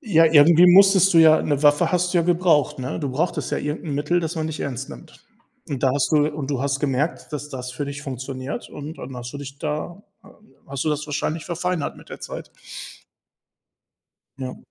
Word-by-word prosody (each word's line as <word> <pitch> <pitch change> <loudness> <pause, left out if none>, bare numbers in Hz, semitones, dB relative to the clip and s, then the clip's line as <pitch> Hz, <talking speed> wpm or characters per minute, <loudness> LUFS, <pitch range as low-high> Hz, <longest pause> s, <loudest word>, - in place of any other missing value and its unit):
Ja, 165 -7 +4
irgendwie 160 +3 +6
musstest 190 0 +6
du, 165 - +5
ja 160 -1 +6
'ne 145 -1 -1
Waffe 150 +3 +4
hast 180 0 0
du - - +5
ja 170 - +3
gebraucht, 170 -6 +2
ne? 130 +4 -4
Du 140 -4 -2
brauchtest 160 +7 -2
ja - - -1
irgend 150 +3 -4
'n 145 -3 -3
Mittel, 150 +5 0
das 165 +1 -4
man 155 -1 -2
dich 155 -1 -5
ernst 135 -1 -4
nimmt. - - -13 0.4
Und 135 -3 -4
da 130 - +4
hast 140 -1 0
du 150 -1 +4
und 145 -2 -5
du 135 -2 -1
hast 140 0 0
gemerkt, 145 +3 -2
dass 150 0 -5
das 125 -2 -6
für 140 +4 -4
dich 140 0 -7
funktioniert 130 0 -6
und 150 +2 -8
dann 130 0 -8
hast 120 +1 -7
du 140 - -7
dich 140 0 -9
da 155 +5 -4 0.2
h - - -18 0.3
hast 140 +1 -4
du - - 0
das 150 0 -2
wahrscheinlich 155 +2 -3
verfeinert 175 -2 -3
mit - - -16
der - - -9
Zeit. - - -8 1.9
Ja. 130 -1 -5
150 Hz, 210 wpm, -22 LUFS, 140-165 Hz, 1.9 s, irgendwie